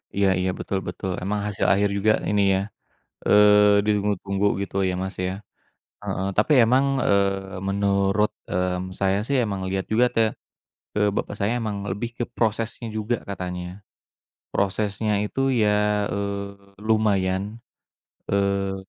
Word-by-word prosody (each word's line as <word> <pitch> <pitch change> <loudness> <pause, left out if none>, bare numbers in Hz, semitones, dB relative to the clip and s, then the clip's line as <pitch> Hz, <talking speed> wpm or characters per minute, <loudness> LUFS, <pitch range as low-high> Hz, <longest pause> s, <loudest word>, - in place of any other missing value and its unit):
Iya 100 0 +3
iya, 95 0 0
betul 95 - -2
betul. 90 +1 -4
Emang 105 +2 -1
hasil 105 -2 -2
akhir 100 +1 +2
juga 110 +2 +3 0.2
ini 105 0 +2 0.2
ya, - - 0 0.7
eee, 105 0 +6
ditunggu-tunggu 100 -1 0 0.2
gitu 100 - -6
ya, 90 - -1
Mas, 95 0 -4
ya. 95 +3 -3 0.6
Heeh, 95 - -2
tapi 110 +9 +3
emang, 130 +4 +3 0.2
eee, 100 -1 0
menurut, 100 +1 +1 0.2
mmm, 90 0 -2
saya 95 0 +1
sih 140 - +2
emang 100 -3 -3
lihat 95 0 -2
juga 120 +3 +4
te 115 - +4 0.7
eee, 105 0 +3
bapak 100 - -3
saya 100 +2 0
emang 110 -3 -3 0.2
lebih 115 +5 -4
ke 120 - -1
prosesnya 115 +1 -1
juga 110 +3 0
katanya. 90 0 -6 0.7
Prosesnya 105 +2 -1
itu 105 - -4 0.2
ya, 105 -1 +3 0.4
eee, 100 0 -5
lumayan, 100 -4 +2 0.9
eee, 100 -1 +1
100 Hz, 135 wpm, -24 LUFS, 95-105 Hz, 0.9 s, eee